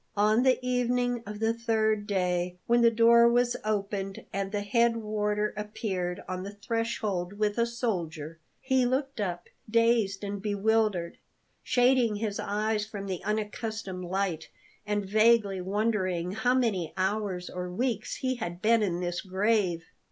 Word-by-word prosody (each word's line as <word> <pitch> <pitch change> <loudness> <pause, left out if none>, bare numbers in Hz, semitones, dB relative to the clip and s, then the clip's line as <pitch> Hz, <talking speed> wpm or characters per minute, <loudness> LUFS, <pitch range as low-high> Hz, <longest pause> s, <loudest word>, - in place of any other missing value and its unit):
On 215 +3 +4
the 260 0 +4
evening 245 -1 +1
of 210 0 -6
the 225 +1 +2
third 220 -2 0
day, 180 -2 0
when 240 0 +3
the 235 - +7
door 235 +1 +6
was 240 0 +2
opened 200 -2 -2
and 195 0 -2
the 205 -1 -1
head 230 +3 +2
warder 210 -1 -1
appeared 195 -4 -3
on 185 0 -4
the 200 +2 -7
threshold 210 -4 -2
with 210 +1 -1
a 235 - +3
soldier, 170 - -3 0.2
he 260 -1 +2
looked 265 +1 -1
up, 175 -3 -3 0.2
dazed 230 -3 +2
and 200 0 -4
bewildered, 205 -3 0 0.4
shading 245 -3 +3
his 205 -1 -3
eyes 210 +1 -1
from 210 -2 -6
the 185 -3 -4
unaccustomed 210 -3 -3
light, 180 -3 -2 0.4
and 205 -1 0
vaguely 215 -1 +3
wondering 185 -3 -1
how 220 +5 +1
many 205 -10 0
hours 190 -1 -1
or 180 0 -5
weeks 225 +2 -2
he 260 -1 -2
had 175 -6 -5
been 225 +3 +3
in 180 -4 -1
this 175 0 -2
grave. 190 -3 0
210 Hz, 150 wpm, -28 LUFS, 190-230 Hz, 0.4 s, the